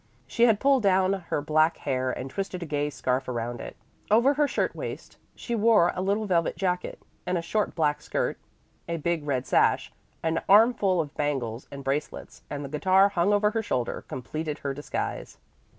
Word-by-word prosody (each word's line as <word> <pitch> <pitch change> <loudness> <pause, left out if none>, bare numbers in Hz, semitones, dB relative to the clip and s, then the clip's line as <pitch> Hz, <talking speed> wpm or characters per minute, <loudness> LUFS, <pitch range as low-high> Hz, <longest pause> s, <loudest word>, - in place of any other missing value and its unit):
She 235 - +2
had 220 -3 +3
pulled 275 -2 +3
down 190 -1 +3
her 175 -6 -3
black 155 +2 +2
hair 130 -2 -1
and 130 - -5
twisted 185 +4 -4
a - - -5
gay 145 -1 -1
scarf 130 -2 -2
around 120 -1 -3
it. - - -8 0.3
Over 235 +7 +5
her 295 +1 +2
shirt - - -1
waist - - -7 0.2
she 240 - -5
wore 215 -5 +4
a 180 - -3
little 200 +3 0
velvet 170 -4 +1
jacket; 180 -2 -2 0.3
and 180 0 +1
a 170 - -3
short 210 +5 -1
black 150 -2 +1
skirt, - - -2 0.5
a 170 - -1
big 165 -1 -2
red 130 -2 -1
sash, - - +2 0.3
an 165 0 0
armful 200 -4 +5
of 150 -2 -7
bangles 135 -5 -2
and 140 0 -8
bracelets, 140 +3 -4
and 145 -1 -5
the - - -7
guitar 190 +6 +4
hung 195 0 +1
over 210 0 +3
her 225 0 -1
shoulder, 125 - -2
completed 150 +4 -4
her 140 -1 -3
disguise. 145 +2 -5
170 Hz, 185 wpm, -26 LUFS, 145-200 Hz, 0.5 s, Over